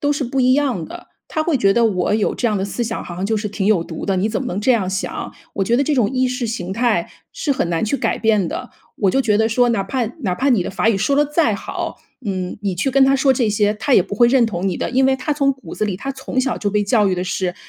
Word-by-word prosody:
都 290 0 +1
是 285 -1 -2
不 265 +3 -1
一 255 +1 +4
样 260 - 0
的。 - - -10 0.2
他 315 - -1
会 310 -3 +1
觉 195 -4 +3
得 235 - +3
我 195 -3 +1
有 215 -1 0
这 245 - -1
样 210 - 0
的 190 - -1
思 205 +4 -3
想， 225 -1 -3
好 175 - -7
像 185 - -3
就 220 +1 0
是 210 0 -2
挺 200 -1 -3
有 210 -6 +3
毒 165 - -7
的， 195 -1 +1
你 200 +4 +1
怎 220 - -2
么 265 - -4
能 190 +3 -3
这 255 +4 +3
样 200 -6 0
想？ 190 0 -4 0.2
我 195 - -1
觉 235 +5 +2
得 275 - +3
这 300 - +1
种 240 -6 +2
意 255 -1 +1
识 250 -1 -2
形 190 -5 -4
态 225 -5 +1 0.2
是 295 - -3
很 220 -10 -1
难 170 +4 0
去 220 +6 0
改 - - -1
变 215 -6 +2
的， - - -6 0.3
我 195 -2 +2
就 270 - +2
觉 215 -5 +2
得 220 +1 +2
说 245 +2 +2
哪 220 -4 +1
怕 235 +5 -1 0.2
哪 190 -9 -1
怕 270 +8 0
你 230 -8 +3
的 - - -3
法 190 +2 0
语 225 - +3
说 215 +8 +1
得 295 - +4
再 295 -7 +1
好， - - -5 0.3
嗯， 185 -3 -3
你 195 -3 -1
去 270 +10 0
跟 270 +1 +5
他 270 - +4
说 270 0 +3
这 240 -4 +1
些， 210 0 +2
他 260 +6 -2
也 - - +6
不 195 +3 -6
会 240 - +6
认 255 -1 +4
同 195 -3 -3
你 185 - -1
的。 - - -3
因 260 +1 +2
为 265 - +4
他 300 - -2
从 280 -1 +2
骨 265 0 -11
子 - - -1
里， 200 -3 -2
他 270 +8 -5
从 265 0 -3
小 260 -2 -1
就 205 - -1
被 210 +1 +1
教 210 -1 +3
育 185 - +1
的 180 - -2
是 185 -1 -2
220 Hz, 330 characters per minute, -19 LUFS, 195-260 Hz, 0.3 s, 也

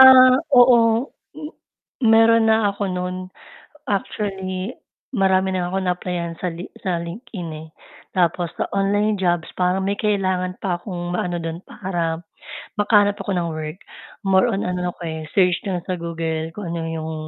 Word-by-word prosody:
Ah, 255 -1 +10 0.2
oo. 240 -2 +6 0.3
M 305 +1 -8 0.6
meron 225 0 +6
na 220 -2 +3
ako 200 -1 -2
no'n, 180 0 -4 0.6
actually 195 0 -3 0.4
marami 190 -4 +2
na 175 -1 -1
akong 190 -1 -1
naaplayan 175 -2 -2
sa 180 -2 -2
Li 175 +3 -7 0.2
sa 180 -3 0
LinkedIn, 175 0 -7 0.2
eh, - - -14 0.5
tapos 175 -2 +1
sa - - 0
online 205 +2 +2
jobs, 175 -3 0
parang 180 +1 +2
may 200 - 0
kailangan 185 -4 0
pa 180 -3 0
akong 175 -2 -4
maano 175 -1 -2
do'n 165 +2 -5
para 170 -4 -3 0.6
makahanap 205 -1 +4
ako 205 - -3
ng 170 -1 -1
work. 155 +1 -5 0.5
More 190 +5 +4
on 195 - -1
ano 180 0 -1
ako, 175 - -7
eh, 160 -1 -4
search 180 -2 +4
lang 175 -2 -3
sa 185 - -2
Google 165 -2 -3
kung 180 -5 -4
ano 170 - -2
'yong 160 0 -4
185 Hz, 155 wpm, -22 LUFS, 175-205 Hz, 0.6 s, Ah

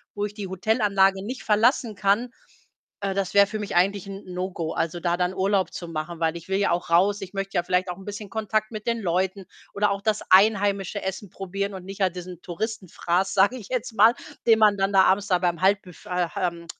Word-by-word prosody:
wo 205 0 -1
ich 210 - -6
die 205 -2 -6
Hotelanlage 195 -1 +2
nicht 255 +3 -6
verlassen 225 +1 +2
kann, 205 +5 +1 0.7
äh, 195 -1 -1
das 195 -2 -2
wäre 200 0 +6
für 215 0 -5
mich 205 - -5
eigentlich 195 +2 +1
‘n 195 0 -8
No-Go. 180 -3 -4
Also, 170 +1 -2
da 175 0 0
dann 180 +1 0
Urlaub 195 0 +1
zu 175 - -6
machen, 165 +1 -5
weil 165 0 0
ich 170 +2 -10
will 190 - +1
ja 205 - +2
auch 175 -1 -1
raus. 200 +4 +3
Ich 185 - -7
möchte 195 0 -4
ja 175 - +2
vielleicht 180 0 0
auch 180 - -5
‘n 195 - -12
bisschen 205 0 -7
Kontakt 215 0 -1
mit 215 -1 -7
den 230 -1 0
Leuten 190 +1 -1 0.3
oder 205 0 +2
auch 200 0 -2
das 215 0 0
einheimische 200 0 +3
Essen 190 +1 -5
probieren 195 +2 -4
und 185 -1 -8
nicht 195 +1 -8
halt 185 -1 +1
diesen 180 -1 -8
Touristenfraß, 190 -1 -2
sage 200 +5 +4
ich 210 - -11
jetzt 250 -2 -3
mal, 220 +3 +6 0.3
den 220 -1 +6
man 210 -2 +5
dann 195 +1 +1
da 190 -1 +6
abends 195 +2 +2
da 180 -2 +2
beim 175 -1 -1
Halbbüf 190 -2 0
ach, 180 -2 -1
ähm, 170 -2 -3
195 Hz, 225 wpm, -24 LUFS, 180-205 Hz, 0.7 s, wäre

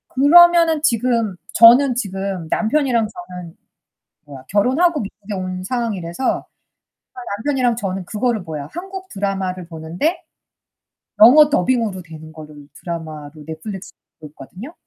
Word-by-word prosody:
그러면은 335 +2 +5
지금 230 -6 +1 0.2
저는 245 +3 +6
지금 195 -6 -4
남편이랑 240 -2 +1
저는 180 -3 -10 0.7
뭐야? 135 -3 -12
결혼하고 270 - +2
미국에 205 0 -7
온 185 -1 -5
상황이라서 215 -2 -3 0.9
남편이랑 250 -1 0
저는 195 -4 -4
그거를 220 +2 -1
뭐야? 155 -5 -7
한국 380 +2 -8
드라마를 190 -3 -3
보는데 175 - -3 1.0
영어 295 +7 +8
더빙으로 235 -9 0
되는 160 -1 -12
거를 150 -2 -13
드라마로 155 -4 -7
넷플릭스 185 +5 -8 0.3
보고 155 - -10
있거든요. 190 - -11
205 Hz, 305 characters per minute, -19 LUFS, 175-255 Hz, 1.0 s, 영어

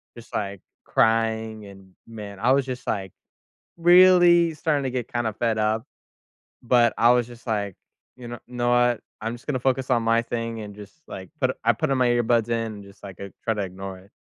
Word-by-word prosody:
just, 120 0 -14
like, 100 -2 -3 0.2
crying, 110 -1 +1
and, 95 -1 -15
man, 105 -3 -9
I 120 +5 +2
was 135 +1 +4
just, 130 -1 -6
like, 95 -3 -2 0.7
really 175 -1 +6
starting 150 -2 0
to 130 - -2
get 125 -2 -3
kinda 120 -2 -1
fed 115 0 -1
up, 110 +3 0 0.8
but 120 -1 +3
I 115 +1 +5
was 120 -1 +2
just, 120 0 -14
like, 100 -4 -1 0.4
"You 125 -2 -10
know 120 0 -7
know 120 -1 -1
what? 120 -1 +3 0.2
I'm 115 +2 -3
just 120 - -13
gonna 130 -3 0
focus 130 0 0
on 120 -2 +3
my 115 +1 +3
thing," 115 -1 -4
and 105 -1 -8
just, 105 -1 -12
like, 95 -1 -8
put 130 -1 +1
I 115 - +5
put 155 -2 -1
all 135 - +2
my 125 - +3
earbuds 120 -1 +2
in 115 -2 -2
and 100 -1 -11
just, 100 +1 -17
like, 95 -3 -10
uh, 100 0 -7
try 115 - +1
to 105 - -2
ignore 95 0 -7
it. 95 +2 -21
115 Hz, 210 wpm, -24 LUFS, 105-125 Hz, 0.8 s, really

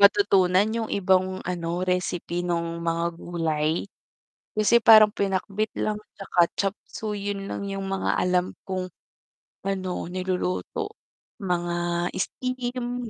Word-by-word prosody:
matutunan 200 -2 +5
yung 225 -1 -2
ibang 185 -1 +1
ano 175 0 -2
recipe 180 -1 -1
nung 170 -1 -2
mga 170 0 0
gulay, 165 -2 -1 0.7
kasi 220 +2 +3
parang 215 -1 +8
pinakbet 200 +2 -1
lang 215 - 0 0.2
'tsaka 195 -2 -3 0.2
chopseuy, 205 +1 -3
yun 195 -1 -5
lang 200 - -4
yung 195 0 -3
mga 195 0 0
alam 180 0 +2 0.2
kong 185 -1 -2 0.8
ano 190 -2 -2
niluluto 180 - -2 0.5
mga 175 -1 0
steam, 245 -1 -3
185 Hz, 110 wpm, -25 LUFS, 175-205 Hz, 0.8 s, parang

